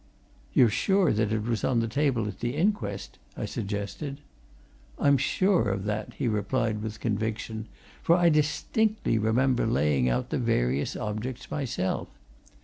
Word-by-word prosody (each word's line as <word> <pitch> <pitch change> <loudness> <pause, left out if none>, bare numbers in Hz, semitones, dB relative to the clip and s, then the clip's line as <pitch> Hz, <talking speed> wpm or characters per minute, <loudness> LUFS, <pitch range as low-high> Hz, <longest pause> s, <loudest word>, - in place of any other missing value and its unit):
"You're 120 -4 +5
sure 190 - +3
that 110 0 +1
it 110 -1 0
was 115 -1 -1
on 125 -3 +2
the 115 - 0
table 125 -3 +1
at 95 -2 -7
the 120 +3 -2
inquest?" 145 - -1 0.2
I - - -2
suggested. 105 +7 -4 0.8
"I'm 140 0 +4
sure 175 - +2
of 95 0 -2
that," 105 0 -3
he - - -1
replied 110 0 0
with 110 0 -5
conviction, 110 0 -2 0.3
"for 170 - +4
I 175 -1 +4
distinctly 155 - +1
remember 120 +3 +2
laying 70 - +2
out - - -1
the - - 0
various 60 +4 0
objects 110 +4 -4
myself. 125 -10 -2
115 Hz, 145 wpm, -27 LUFS, 105-140 Hz, 0.8 s, You're